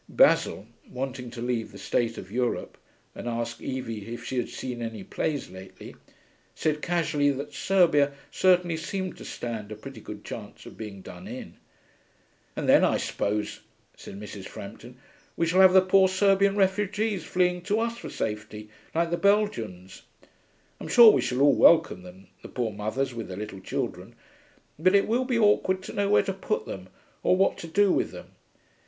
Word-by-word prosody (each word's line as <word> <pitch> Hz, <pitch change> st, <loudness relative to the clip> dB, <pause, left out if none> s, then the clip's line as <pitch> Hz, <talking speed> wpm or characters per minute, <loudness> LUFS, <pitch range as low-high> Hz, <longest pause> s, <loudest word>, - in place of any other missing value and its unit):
Basil, 100 Hz, -, +3 dB, 0.2 s
wanting 130 Hz, -1 st, -5 dB
to 120 Hz, 0 st, -7 dB
leave 120 Hz, -3 st, -2 dB
the 100 Hz, -, -11 dB
state 115 Hz, +3 st, -1 dB
of 95 Hz, -, -9 dB
Europe 120 Hz, +1 st, -2 dB, 0.4 s
and -, -, -7 dB
ask 115 Hz, 0 st, -4 dB
Evie 115 Hz, -4 st, -5 dB
if 120 Hz, 0 st, -6 dB
she 130 Hz, -, -4 dB
had 120 Hz, -, -1 dB
seen 125 Hz, -2 st, -6 dB
any 115 Hz, -3 st, -5 dB
plays 145 Hz, +8 st, -3 dB
lately, 95 Hz, +1 st, -11 dB, 0.6 s
said 150 Hz, -1 st, -1 dB
casually 155 Hz, -4 st, +1 dB
that 140 Hz, +1 st, -4 dB
Serbia 150 Hz, -3 st, +3 dB, 0.2 s
certainly 180 Hz, -3 st, +3 dB
seemed 185 Hz, +3 st, -4 dB
to -, -, -10 dB
stand 110 Hz, -3 st, -6 dB
a -, -, -5 dB
pretty 105 Hz, -, -10 dB
good -, -, -9 dB
chance -, -, -8 dB
of -, -, -11 dB
being 100 Hz, -4 st, -8 dB
done -, -, -10 dB
in. -, -, -8 dB, 1.0 s
'And -, -, -3 dB
then, -, -, +6 dB
I -, -, +3 dB
suppose,' 105 Hz, +1 st, -2 dB, 0.4 s
said 100 Hz, -, -10 dB
Mrs. 105 Hz, -2 st, -8 dB
Frampton, 120 Hz, +5 st, -10 dB, 0.4 s
'we 170 Hz, -, +2 dB
shall 180 Hz, +3 st, +4 dB
have 190 Hz, -1 st, +8 dB
the 190 Hz, -, +8 dB
poor 190 Hz, 0 st, +5 dB
Serbian 195 Hz, +1 st, +3 dB
refugees 205 Hz, 0 st, 0 dB
fleeing 180 Hz, +1 st, +1 dB
to 210 Hz, +2 st, +1 dB
us 230 Hz, 0 st, -1 dB
for 240 Hz, -, -8 dB
safety, 105 Hz, 0 st, -5 dB, 0.3 s
like 170 Hz, 0 st, +1 dB
the 170 Hz, -, +1 dB
Belgians. 115 Hz, -, 0 dB, 0.8 s
I'm -, -, -7 dB
sure 235 Hz, -2 st, +9 dB
we -, -, +2 dB
shall 125 Hz, +2 st, -1 dB
all 145 Hz, 0 st, +6 dB
welcome 160 Hz, -, +5 dB
them, 90 Hz, +2 st, -13 dB, 0.2 s
the -, -, -10 dB
poor 120 Hz, -3 st, -2 dB
mothers 110 Hz, +6 st, -2 dB
with 115 Hz, -1 st, -6 dB
their 95 Hz, -, -7 dB
little 105 Hz, -2 st, -6 dB
children. -, -, -4 dB, 0.6 s
But 185 Hz, +4 st, +4 dB
it 200 Hz, -, +4 dB
will 245 Hz, +3 st, +1 dB
be 250 Hz, -2 st, 0 dB
awkward 195 Hz, -3 st, +3 dB
to -, -, -8 dB
know 200 Hz, 0 st, 0 dB
where 205 Hz, -, +5 dB
to 195 Hz, -, -2 dB
put 435 Hz, -, -2 dB
them -, -, -8 dB, 0.3 s
or 185 Hz, -, +3 dB
what 195 Hz, -, +2 dB
to 170 Hz, -, -7 dB
do 200 Hz, +4 st, +3 dB
with -, -, +1 dB
them. -, -, -11 dB
145 Hz, 180 wpm, -27 LUFS, -, 1.0 s, sure